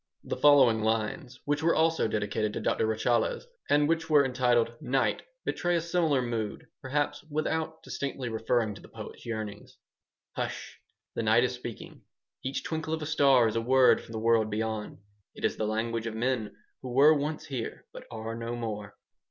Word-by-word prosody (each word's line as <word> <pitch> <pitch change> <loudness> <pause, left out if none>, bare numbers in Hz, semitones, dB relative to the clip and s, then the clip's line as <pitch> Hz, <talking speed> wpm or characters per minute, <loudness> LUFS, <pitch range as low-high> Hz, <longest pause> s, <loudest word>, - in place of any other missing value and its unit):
The - - -3
following 135 -7 +6
lines, 115 +5 -1
which 145 +1 0
were 165 +1 +3
also 160 -4 +2
dedicated 105 0 -1
to - - -3
Doctor - - +1
Rachaeles 110 - 0 0.2
and 145 0 +4
which 165 0 0
were 145 -2 +6
entitled 125 -3 +2
"Night," 135 -1 +1 0.2
betray 175 0 0
a 170 - +1
similar 165 -6 +1
mood, 115 -3 -3 0.2
perhaps, 145 +2 -1
without 160 +1 -2
distinctly 135 -2 -4
referring 110 -1 0
to 100 - -12
the - - -13
poet's - - -10
yearnings 110 -3 -6 0.6
"Hush! - - -5 0.3
the - - -2
night 110 +2 +4
is 125 - 0
speaking. 120 -2 -8 0.4
Each 135 +1 -3
twinkle 160 0 -2
of 160 - -6
a - - -3
star 140 -5 +4
is 110 - -2
a 115 - +1
word 130 +2 +5
from 115 - -12
the - - -3
world 110 -1 +3
beyond. 110 0 -3 0.4
It - - -3
is - - +1
the 110 - -1
language 115 +1 -1
of 110 - -4
men 120 -2 -1 0.3
who 130 - -6
were 145 +4 +7
once 150 +1 -2
here, 130 -5 -5
but - - -10
are 110 0 -5
no 115 +1 -4
more. 105 -3 -5
120 Hz, 180 wpm, -29 LUFS, 110-145 Hz, 0.6 s, were